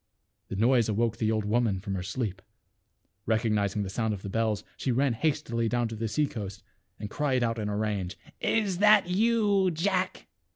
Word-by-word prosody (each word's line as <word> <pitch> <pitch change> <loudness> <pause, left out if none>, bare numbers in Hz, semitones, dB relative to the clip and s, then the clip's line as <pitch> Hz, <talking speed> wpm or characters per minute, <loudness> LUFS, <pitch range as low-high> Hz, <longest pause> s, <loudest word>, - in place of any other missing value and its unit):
The - - -5
noise 115 +2 +3
awoke 110 +1 0
the 110 -1 +1
old 110 -2 0
woman 110 -2 +1
from 100 0 -5
her 95 - -2
sleep. 95 0 -3 0.9
Recognizing 105 -2 +1
the 95 - -4
sound 110 0 -1
of 95 - -11
the 100 - -5
bells, 110 -1 0
she 130 - -1
ran 130 +1 +2
hastily 120 -4 0
down 120 0 +1
to 115 - -6
the 110 +1 -2
sea 150 +7 +1
coast 100 -8 -7 0.4
and 105 - -4
cried 130 +1 0
out 115 -1 0
in 105 -1 -2
a 105 - -2
rage, 100 -4 -2 0.2
" - - -45 0.2
Is 190 -4 -3
that 210 -2 +6
you, 205 -1 +3
Jack?" 185 +2 -1
115 Hz, 195 wpm, -28 LUFS, 105-145 Hz, 0.9 s, that